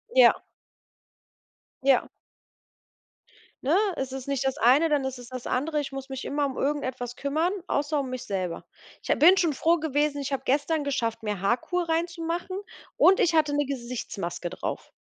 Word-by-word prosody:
Ja. - - +6 1.4
Ja. 265 -2 +4 1.6
Ne, 285 +6 +3 0.2
es 265 -1 -3
ist 265 0 -6
nicht 275 -1 -1
das 265 +1 -1
eine, 290 +6 +5
dann 290 -3 +1
ist 265 -1 -4
es 245 0 -11
das 255 -1 -7
andere. 300 +4 0
Ich 285 - -4
muss 270 0 -7
mich 265 -1 -5
immer 285 0 0
um 265 - -6
irgendetwas 260 -4 -2
kümmern, 315 +7 0
außer 290 +1 0
um 270 -2 -3
mich 255 -1 -5
selber. 185 -4 -3 0.4
Ich - - -1
ha - - +4
bin 360 +6 +7
schon 330 -6 +2
froh 335 +5 +2
gewesen, 295 -1 0
ich 280 0 -3
habe 270 - -1
gestern 295 +3 +1
geschafft, 230 -5 -1
mir 210 -4 -3
Haarkur 250 - 0
reinzumachen 335 +2 -2 0.4
und 385 +1 +6
ich 340 -1 +3
hatte 305 -2 +3
'ne 290 -1 +1
Gesichtsmaske 235 -9 -4
drauf. 185 - -5
280 Hz, 170 wpm, -26 LUFS, 255-315 Hz, 1.6 s, bin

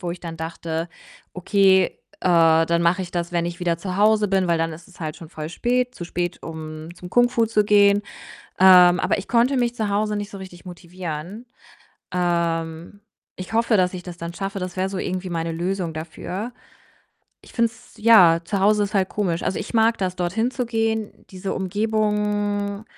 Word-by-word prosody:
wo 175 -3 -3
ich 175 - -6
dann 165 -2 -7
dachte: 165 0 -4 0.5
„Okay, 190 0 +3 0.2
äh, 165 -2 +4
dann 170 0 +1
mache 175 +3 +2
ich 175 - -8
das, 170 -1 -3
wenn 170 -1 0
ich 175 +1 -5
wieder 170 -1 0
zu 180 +2 -5
Hause 215 0 +4
bin, 190 -1 +1
weil 170 - +3
dann 165 0 -1
ist 165 +2 -12
es 185 - -19
halt 155 -2 -4
schon 165 - -11
voll 155 -1 -7
spät 250 +6 0
zu 175 - -7
spät, 175 0 -4
um 155 -1 -7
zum 180 0 -11
Kung 245 +3 +4
Fu 235 -2 +1
zu 215 -1 +2
gehen.“ 205 0 +5 0.6
Ähm, 180 -1 +7
aber - - +1
ich 195 - -6
konnte 245 +3 +2
mich 240 -1 +1
zu 215 -3 -2
Hause 210 +1 0
nicht 205 0 -4
so 200 - -9
richtig 185 -2 -11
motivieren. 175 +3 -7 0.7
Ähm, 170 0 -1 0.4
ich 185 +4 -8
hoffe, 230 -1 +3
dass 180 -1 +2
ich 180 -1 -6
das 175 -1 -9
dann 170 0 -6
schaffe. 195 +2 -4
Das 180 -1 -5
wär 190 +1 0
so 195 - -5
irgendwie 185 0 -3
meine 165 -1 -2
Lösung 175 0 -2
dafür. 175 +7 -6 0.9
Ich - - -16
finde 230 -1 +2
es 240 +2 -19
ja, 210 -7 +6
zu 200 - -2
Hause 210 +2 +4
ist 200 - -7
halt 190 -2 +2
komisch. 180 -5 -2
Also, - - -1
ich - - -7
mag 225 0 +4
das, 185 -2 -2
dorthin 195 +7 0
zu 250 -2 -3
gehen. 225 -2 -1 0.2
Diese 190 +1 -4
Umgebung 205 0 -1
185 Hz, 200 wpm, -22 LUFS, 170-210 Hz, 0.9 s, Ähm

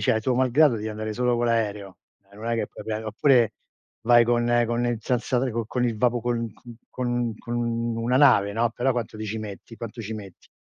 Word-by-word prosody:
cioè 120 -4 +2
tuo 125 +3 0
malgrado 130 +2 +4
devi 110 0 -4
andare 110 0 -4
solo 125 0 +1
con 120 0 0
l'aereo. 105 -4 -1 0.3
Eh, 100 - -17
non 110 +2 -8
è 115 - +1
che 115 - -1
puoi - - -11
pre 110 0 -3
oppure 115 +2 +3 0.5
vai 120 0 +6
con 120 0 +2
con 120 +1 -1
il 120 -1 -1
senza 125 +1 0
co 115 0 -2
con 125 +2 -1
il 115 -3 0
vapo 120 +1 +1
con 115 0 -1
c - - -25 0.3
con 120 -2 -2
con 120 - -6
una 115 +1 -1
nave, 120 -8 +5
no, 115 +2 +1
però 125 +3 0
quanto 115 -3 -4
ti 110 - -5
ci 110 +1 -4
metti? 105 +2 -8
Quanto 115 0 -7
ci 110 +1 -5
metti? 100 -4 -10
115 Hz, 220 wpm, -25 LUFS, 110-120 Hz, 0.5 s, vai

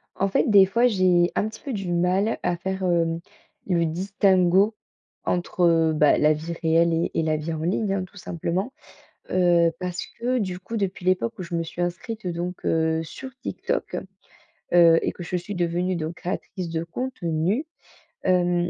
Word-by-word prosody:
En 195 - +1
fait, 195 - +1
des 200 -2 +8
fois, 235 +6 +3
j'ai 185 -5 +3
un 215 - +1
petit 220 - -10
peu 275 - -5
du 195 -4 -3
mal 185 +5 +1
à 175 - 0
faire, 190 +2 -3
hem, 165 -2 +1 0.5
le 170 -3 +2
distinguo 190 +3 +2 0.5
entre, 180 +1 -1
heu, 165 -1 +4
bah, 150 -1 +4
la 150 +1 +4
vie 160 +3 -5
réelle 165 +1 +3
et 165 +1 0
et - - +1
la 155 -1 +1
vie 155 +2 -4
en 160 - -4
ligne, 195 +4 0
hein, 195 -1 -1
tout 200 +2 -18
simplement. 185 - -3 0.6
Heu, 175 -2 +4
parce 180 -1 -3 0.2
que 250 +2 0
du 185 -5 -2
coup 225 +5 -6
depuis 195 -3 -2
l'époque 180 -11 +1
où - - -4
je 170 -1 -6
me 165 - 0
suis 165 +1 -7
inscrite 190 +4 -4
donc 175 +1 -4
heu, 160 0 +1
sur 260 +11 -8
TikTok, - - -3 0.8
heu, 170 -1 +7
et - - -1
que - - -9
je 175 +1 -2
suis 180 +4 -5
devenue 175 +1 0
donc 160 0 -4
créatrice 185 0 -5
de 165 0 -2
contenu, 190 - -2 0.6
hem, 175 -1 +2
180 Hz, 185 wpm, -24 LUFS, 170-195 Hz, 0.8 s, des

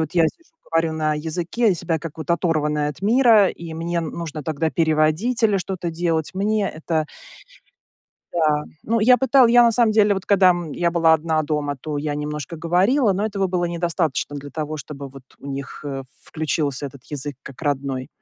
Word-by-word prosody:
вот 160 +1 -2
я 170 -2 +5
сижу 335 - -8 0.2
говорю 165 -1 +2
на 155 -1 0
языке, 170 +9 -1
я 190 - +3
себя 165 -1 -2
как 165 0 -8
вот 160 - -5
оторванная 150 -4 0
от 150 - -8
мира, 220 -1 +5
и 165 -1 -7
мне 170 +1 -2
н 160 -2 -3
нужно 160 -3 -6
тогда 160 +1 -1
переводить 160 +9 +1
или 210 -2 +4
что-то 185 -1 -4
делать, 165 -2 -1
мне 205 +1 0
это 155 0 -2 1.3
Да, 155 -3 +1 0.2
ну, 230 +1 0
я 250 +4 +6
пытала 260 0 +5
я 240 +1 +6
на 235 -1 +4
самом 230 -2 +3
деле, 210 -1 +4
вот 190 - -5
когда, 190 -2 +5
м, 175 -4 -2
я 175 -1 0
была 165 -1 +4
одна 160 0 0
дома, 145 -1 -2
то 150 -2 -4
я 145 0 -2
немножко 150 +2 -5
говорила, 195 - +2
но 200 +3 -1
этого 200 -3 -1
было 180 -1 -1
недостаточно 170 -4 -1
для 145 0 -8
того, 155 0 -4
чтобы 140 -1 -8
вот 135 0 -13 0.2
у - - -12
них, 140 0 -6
э, 135 -2 -4 0.2
включился 145 -3 -2
этот 135 -1 -12
язык 145 -2 -6
как 140 +3 -11
родной. 135 -2 -2
165 Hz, 195 wpm, -22 LUFS, 150-190 Hz, 1.3 s, я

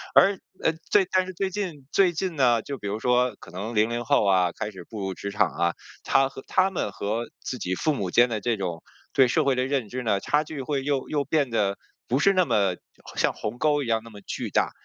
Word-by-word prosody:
而 195 0 +6 0.3
呃， 160 - +3 0.2
最 200 -2 +5
但 185 0 +2
是 185 - -6
最 190 +2 -1
近 175 -9 -4
最 190 -3 +5
近 175 0 -3
呢， 120 -4 +4
就 140 -1 -5
比 100 - -5
如 105 +2 -2
说 125 -1 +2
可 - - -13
能 105 +6 -5
00 115 +3 +1
后 110 - +3
啊， 90 -3 +3
开 105 +4 -5
始 95 -3 -10
步 110 - -7
入 95 -1 -2
职 100 - -5
场 100 -4 +2
啊， 85 +4 0 0.3
他 135 0 +3
和 135 - -10
他 190 +1 +3
们 135 - -2
和 110 +5 -2 0.2
自 125 - -4
己 95 -1 -2
父 155 - +1
母 100 -9 -2
间 120 +5 +6
的 110 -3 -2
这 115 +1 0
种 85 -4 -3 0.3
对 135 -2 +5
社 150 +3 +2
会 135 - +3
的 130 0 +1
认 135 -6 -1
知 130 +3 -4
呢， 105 -3 +1
差 150 +8 +1
距 150 -2 -6
会 140 -1 -2
又 140 -2 -1
又 145 -2 0
变 145 -4 +1
得 100 -3 +1 0.3
不 125 - +1
是 195 +6 +4
那 185 -2 +3
么 100 - +2 0.4
像 - - +2
鸿 110 +3 -5
沟 150 -2 +2
一 125 - -6
样 110 -1 +1
那 115 - -11
么 105 -2 -12
巨 - - -4
大。 - - +1
125 Hz, 265 characters per minute, -25 LUFS, 105-150 Hz, 0.4 s, 而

